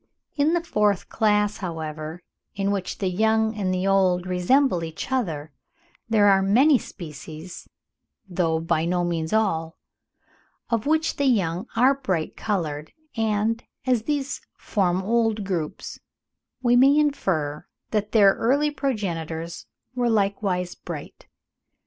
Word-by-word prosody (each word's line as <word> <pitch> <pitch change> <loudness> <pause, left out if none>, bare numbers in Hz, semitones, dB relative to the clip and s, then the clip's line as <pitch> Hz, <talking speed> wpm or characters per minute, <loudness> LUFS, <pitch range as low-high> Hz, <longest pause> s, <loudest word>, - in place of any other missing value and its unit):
In 300 +2 +2
the 345 - 0
fourth 210 - +1
class, 210 -1 +2
however, 160 -1 -5 0.3
in 200 0 0
which 195 -2 -3
the 195 - -1
young 220 +3 +2
and 195 -3 -1
the 185 +1 -1
old 185 -2 +3
resemble 185 +3 +2
each 160 +9 -6
other, 160 - -2 0.6
there 215 -2 +4
are 195 -1 +5
many 250 +8 +5
species 160 0 -9 0.6
(though 170 -3 0
by 165 -1 0
no 175 +1 0
means 165 -2 -2
all), 165 -7 0 0.9
of 230 +2 0
which 315 +1 +1
the 285 - +1
young 190 -4 +1
are 255 +4 +5
bright 190 -13 -2
coloured, 155 -8 -3 0.2
and 220 +1 0 0.2
as 250 -3 +2
these 285 +2 -2 0.2
form 185 -3 0
old 225 0 +1
groups, 175 -6 -4 0.6
we 245 0 +4
may 270 +4 +6
infer 175 - 0 0.2
that 210 -1 -1
their 200 -3 +6
early 285 +5 +1
progenitors 170 - -3 0.3
were 245 -1 0
likewise 195 -4 0
bright. - - -9
200 Hz, 130 wpm, -24 LUFS, 170-230 Hz, 0.9 s, may